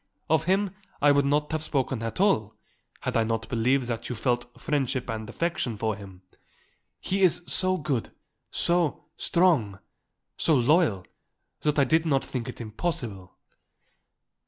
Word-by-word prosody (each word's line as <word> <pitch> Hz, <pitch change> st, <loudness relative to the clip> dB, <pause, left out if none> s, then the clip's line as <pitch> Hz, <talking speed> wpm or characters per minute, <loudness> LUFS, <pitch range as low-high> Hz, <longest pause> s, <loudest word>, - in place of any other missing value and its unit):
Of 160 Hz, -2 st, +3 dB
him 190 Hz, +2 st, +2 dB, 0.3 s
I 145 Hz, 0 st, +5 dB
would 140 Hz, 0 st, +3 dB
not 150 Hz, +2 st, +1 dB
have 155 Hz, -1 st, -1 dB
spoken 135 Hz, -5 st, -1 dB
at 115 Hz, +4 st, -4 dB
all, 110 Hz, -, +2 dB, 0.5 s
had -, -, -3 dB
I 115 Hz, -, +4 dB
not 110 Hz, -1 st, -2 dB
believed 125 Hz, +3 st, +2 dB
that 115 Hz, -1 st, -4 dB
you 125 Hz, -, -3 dB
felt 120 Hz, +1 st, -1 dB
friendship 135 Hz, -4 st, -1 dB
and 110 Hz, 0 st, -5 dB
affection 130 Hz, -6 st, -2 dB
for 110 Hz, 0 st, -1 dB
him. 95 Hz, -2 st, -12 dB, 0.8 s
He 195 Hz, +1 st, -1 dB
is 180 Hz, -1 st, +4 dB
so 185 Hz, 0 st, +2 dB
good, 140 Hz, -8 st, -2 dB, 0.4 s
so 170 Hz, -4 st, +1 dB
strong, 155 Hz, -, +2 dB, 0.6 s
so 160 Hz, -, +4 dB
loyal 130 Hz, -, +3 dB, 0.5 s
that 150 Hz, -1 st, 0 dB
I 140 Hz, -, +5 dB
did 160 Hz, +5 st, +2 dB
not 135 Hz, -3 st, +2 dB
think 125 Hz, -2 st, -4 dB
it 125 Hz, -, -8 dB
impossible." 110 Hz, -, -4 dB
130 Hz, 150 wpm, -27 LUFS, 115-160 Hz, 0.8 s, I